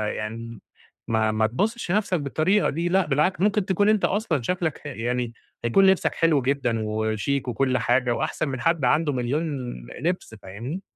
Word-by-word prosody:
يعني 115 Hz, +2 st, -6 dB, 0.5 s
ما 110 Hz, -1 st, +1 dB
ما 110 Hz, 0 st, +2 dB
تبُصش 205 Hz, -, -2 dB
لنفسك 195 Hz, -4 st, +1 dB
بالطريقة 155 Hz, +8 st, +1 dB
دي 170 Hz, +4 st, -1 dB
لأ، 190 Hz, 0 st, +3 dB
بالعكس 150 Hz, +6 st, +1 dB
ممكن 205 Hz, -1 st, +2 dB
تكون 205 Hz, +2 st, +2 dB
أنت 215 Hz, -2 st, +3 dB
أصلًا 190 Hz, -, 0 dB
شكلك 165 Hz, +3 st, -1 dB
ح -, -, -23 dB
يعني 120 Hz, -2 st, -2 dB, 0.3 s
يكون 195 Hz, +12 st, +4 dB
لبسك 190 Hz, -1 st, +2 dB
حلو 160 Hz, -4 st, +3 dB
جدًا 125 Hz, -3 st, 0 dB
وشيك 110 Hz, +5 st, -1 dB
وكل 125 Hz, +2 st, +1 dB
حاجة 120 Hz, +2 st, +2 dB
وأحسن 155 Hz, -, -2 dB
من 130 Hz, -2 st, -4 dB
حد 165 Hz, -5 st, +2 dB
عنده 150 Hz, +3 st, +2 dB
مليون 130 Hz, +5 st, -1 dB, 0.6 s
لِبس 170 Hz, -9 st, -2 dB
فاهمني؟ 120 Hz, -, -6 dB
140 Hz, 165 wpm, -24 LUFS, 120-180 Hz, 0.6 s, يكون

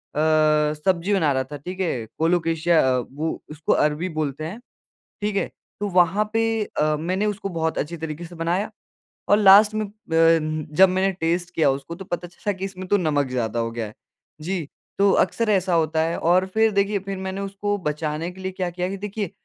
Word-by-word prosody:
अ, 155 Hz, 0 st, +3 dB
सब्ज़ी 175 Hz, +5 st, 0 dB
बना 165 Hz, -7 st, +3 dB
रहा 130 Hz, -1 st, +1 dB
था 145 Hz, -, -5 dB
ठीक 180 Hz, +7 st, -8 dB
है, 145 Hz, -11 st, -1 dB
कोलोकेशिया 165 Hz, 0 st, +2 dB, 0.2 s
वो 145 Hz, +6 st, -4 dB
उसको 150 Hz, 0 st, 0 dB
अरबी 150 Hz, +4 st, +1 dB
बोलते 155 Hz, -2 st, -3 dB
हैं। 175 Hz, +9 st, -6 dB, 0.6 s
ठीक 205 Hz, 0 st, -1 dB
है? 200 Hz, -, +1 dB, 0.3 s
तो 205 Hz, -, -1 dB
वहाँ 185 Hz, +4 st, +3 dB
पे 225 Hz, 0 st, +2 dB, 0.2 s
अ, 155 Hz, -6 st, 0 dB
मैंने 185 Hz, +6 st, -1 dB
उसको 205 Hz, -1 st, -2 dB
बहुत 160 Hz, -2 st, -2 dB
अच्छी 170 Hz, +3 st, -3 dB
तरीके 160 Hz, +1 st, -6 dB
से 175 Hz, +1 st, -11 dB
बनाया 170 Hz, +5 st, -1 dB, 0.6 s
और 205 Hz, -, +5 dB
लास्ट 205 Hz, +1 st, +7 dB
में 215 Hz, 0 st, -1 dB, 0.3 s
प 160 Hz, -2 st, +3 dB
जब 190 Hz, +2 st, +8 dB
मैंने 190 Hz, +1 st, +1 dB
टेस्ट 170 Hz, +2 st, 0 dB
किया 155 Hz, -4 st, +3 dB
उसको 140 Hz, +5 st, -4 dB
तो 190 Hz, -, -9 dB
पता 175 Hz, -1 st, -4 dB
चला 180 Hz, +4 st, -3 dB
कि 190 Hz, 0 st, -6 dB
इसमें 185 Hz, -1 st, -6 dB
तो 205 Hz, -, +4 dB
नमक 150 Hz, -6 st, +1 dB
ज़्यादा 120 Hz, -3 st, -2 dB
हो 115 Hz, 0 st, -1 dB
गया 115 Hz, -1 st, -4 dB
है। 105 Hz, -, -11 dB, 0.5 s
जी, 170 Hz, -1 st, -3 dB, 0.3 s
तो 200 Hz, 0 st, +5 dB
अक्सर 220 Hz, +5 st, +2 dB
ऐसा 190 Hz, -3 st, +2 dB
होता 160 Hz, -1 st, +1 dB
है 165 Hz, +1 st, -1 dB
और 180 Hz, +3 st, +3 dB
फिर 220 Hz, 0 st, +4 dB
देखिए 200 Hz, +1 st, +1 dB
फिर 195 Hz, 0 st, -5 dB
मैंने 190 Hz, +1 st, -4 dB
उसको 200 Hz, +1 st, -2 dB
बचाने 155 Hz, 0 st, -3 dB
के 185 Hz, +1 st, -13 dB
लिए 190 Hz, 0 st, -4 dB
क्या 185 Hz, -1 st, -2 dB
किया 180 Hz, +1 st, -3 dB
कि 195 Hz, -, -4 dB
देखिए 205 Hz, -1 st, -4 dB
175 Hz, 200 wpm, -23 LUFS, 155-195 Hz, 0.6 s, जब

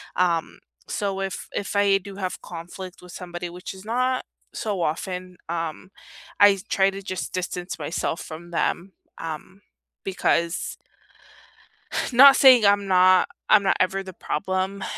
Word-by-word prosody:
Um, 175 Hz, +1 st, 0 dB, 0.3 s
so 195 Hz, -1 st, -2 dB
if 190 Hz, -2 st, -4 dB
if 200 Hz, 0 st, -4 dB
I 200 Hz, -1 st, +4 dB
do 195 Hz, 0 st, -10 dB
have 185 Hz, -3 st, -4 dB
conflict 180 Hz, +2 st, -9 dB
with 180 Hz, -1 st, -13 dB
somebody, 175 Hz, -1 st, -6 dB
which 180 Hz, +2 st, -8 dB
is 190 Hz, +1 st, -12 dB
not 255 Hz, +3 st, 0 dB, 0.3 s
so 205 Hz, -5 st, -3 dB
often, 180 Hz, +3 st, -3 dB
um, 165 Hz, +2 st, -4 dB, 0.5 s
I 205 Hz, -1 st, +7 dB
try 195 Hz, 0 st, +3 dB
to 195 Hz, 0 st, -7 dB
just 185 Hz, -5 st, -5 dB
distance 180 Hz, -1 st, -4 dB
myself 160 Hz, +2 st, -2 dB
from 165 Hz, +2 st, -9 dB
them, 175 Hz, +2 st, -1 dB, 0.2 s
um, 165 Hz, +5 st, -7 dB, 0.4 s
because 170 Hz, -2 st, 0 dB, 1.4 s
Not 270 Hz, +3 st, +9 dB
saying 255 Hz, -5 st, +7 dB
I'm 200 Hz, 0 st, +3 dB
not 185 Hz, 0 st, +5 dB, 0.2 s
I'm 215 Hz, -2 st, +7 dB
not -, -, +3 dB
ever 190 Hz, +1 st, +1 dB
the 185 Hz, -, -8 dB
problem. 190 Hz, +4 st, -2 dB
185 Hz, 140 wpm, -24 LUFS, 175-195 Hz, 1.4 s, Not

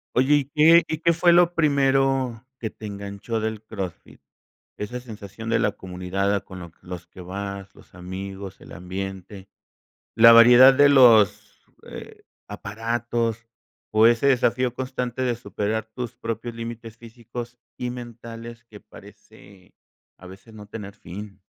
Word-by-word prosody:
Oye, 130 Hz, +4 st, +3 dB
¿y 145 Hz, -2 st, +1 dB
qué 160 Hz, +4 st, +5 dB
y 160 Hz, -, -3 dB
qué 170 Hz, 0 st, +3 dB
fue 175 Hz, +1 st, +4 dB
lo 175 Hz, 0 st, +4 dB
primero 135 Hz, -5 st, +1 dB, 0.2 s
que 110 Hz, -2 st, -4 dB
te 110 Hz, -, -10 dB
enganchó 100 Hz, +3 st, -5 dB
del 110 Hz, -1 st, -4 dB
CrossFit? 95 Hz, -6 st, -8 dB, 0.6 s
Esa 125 Hz, +4 st, -5 dB
sensación 110 Hz, -1 st, -9 dB
de 115 Hz, -1 st, +2 dB
la 105 Hz, -, +1 dB
comunidad, 95 Hz, +2 st, -3 dB
ah, 100 Hz, -, +1 dB
con 95 Hz, -1 st, -10 dB
lo 85 Hz, -2 st, -10 dB
los 90 Hz, -1 st, -9 dB
que -, -, -17 dB
vas, 100 Hz, +1 st, -7 dB
los -, -, -20 dB
amigos, 95 Hz, +2 st, -8 dB
el -, -, -14 dB
ambiente, 95 Hz, +1 st, -7 dB, 0.7 s
la 115 Hz, +1 st, +9 dB
variedad 120 Hz, +3 st, +8 dB
de 145 Hz, +1 st, +6 dB
los, 120 Hz, -7 st, +4 dB, 0.2 s
eh, -, -, -11 dB, 0.3 s
aparatos 115 Hz, +2 st, -3 dB, 0.5 s
o 110 Hz, +1 st, +6 dB
ese 120 Hz, +4 st, +2 dB
desafío 125 Hz, -1 st, +2 dB
constante 130 Hz, -1 st, -4 dB
de 120 Hz, -2 st, 0 dB
superar 110 Hz, -2 st, -3 dB
tus 125 Hz, -3 st, -6 dB
propios 115 Hz, +1 st, -5 dB
límites 115 Hz, -1 st, -8 dB
físicos 120 Hz, +1 st, -9 dB, 0.2 s
y 125 Hz, -1 st, -3 dB
mentales, 115 Hz, -1 st, -9 dB
que 105 Hz, -3 st, -14 dB
parece 95 Hz, -2 st, -17 dB, 0.5 s
a 95 Hz, -, -13 dB
veces 95 Hz, +5 st, -14 dB
no 105 Hz, -1 st, -12 dB
tener 100 Hz, -2 st, -9 dB
fin. 100 Hz, +1 st, -10 dB
115 Hz, 150 wpm, -23 LUFS, 100-125 Hz, 0.7 s, la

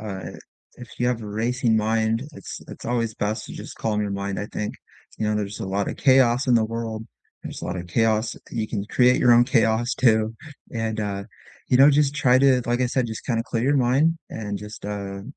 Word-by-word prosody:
uh, 100 Hz, -3 st, -6 dB, 0.5 s
if 125 Hz, -1 st, -11 dB
you 120 Hz, -, +1 dB
have 125 Hz, -2 st, 0 dB
a 105 Hz, -, -7 dB
racing 115 Hz, +2 st, 0 dB
mind, 110 Hz, +1 st, +1 dB
it's 100 Hz, -, -9 dB
it's -, -, -9 dB
always 115 Hz, -2 st, -1 dB
best 105 Hz, +1 st, -2 dB
to -, -, -9 dB
just -, -, -9 dB
calm 105 Hz, -2 st, -1 dB
your 105 Hz, -1 st, -2 dB
mind, 100 Hz, 0 st, -3 dB
I 105 Hz, -, -3 dB
think, 105 Hz, -, -4 dB, 0.4 s
you 110 Hz, -, -1 dB
know, 105 Hz, -, +1 dB
there's 105 Hz, -1 st, -3 dB
a -, -, -3 dB
lot 100 Hz, +1 st, -1 dB
of -, -, -5 dB
chaos 130 Hz, -1 st, +4 dB
in 125 Hz, -, +4 dB
the 115 Hz, -, +4 dB
world, 110 Hz, 0 st, -4 dB, 0.4 s
there's -, -, -7 dB
a -, -, -3 dB
lot -, -, -3 dB
of 90 Hz, 0 st, -6 dB
chaos. 110 Hz, +3 st, +1 dB
You 110 Hz, -3 st, -2 dB
can 100 Hz, -3 st, -3 dB
create 125 Hz, +3 st, +4 dB
your 120 Hz, -1 st, +5 dB
own 120 Hz, +1 st, +6 dB
chaos 120 Hz, -1 st, +2 dB
too, 110 Hz, -3 st, +2 dB, 0.4 s
and, 110 Hz, -2 st, -2 dB
uh, 100 Hz, -1 st, -3 dB, 0.4 s
you 125 Hz, -, +4 dB
know, 140 Hz, +3 st, +8 dB
just 145 Hz, 0 st, +2 dB
try 130 Hz, -3 st, +4 dB
to, 130 Hz, -2 st, +4 dB
like 120 Hz, +1 st, 0 dB
I 125 Hz, -, +3 dB
said, 125 Hz, 0 st, 0 dB
just 110 Hz, -1 st, -7 dB
kinda 115 Hz, -3 st, 0 dB
clear 115 Hz, -1 st, -2 dB
your 140 Hz, +2 st, +3 dB
mind 135 Hz, +6 st, +3 dB
and 105 Hz, -2 st, -4 dB
just, 105 Hz, 0 st, -10 dB
uh, 100 Hz, -1 st, -5 dB
115 Hz, 225 wpm, -24 LUFS, 105-125 Hz, 0.5 s, know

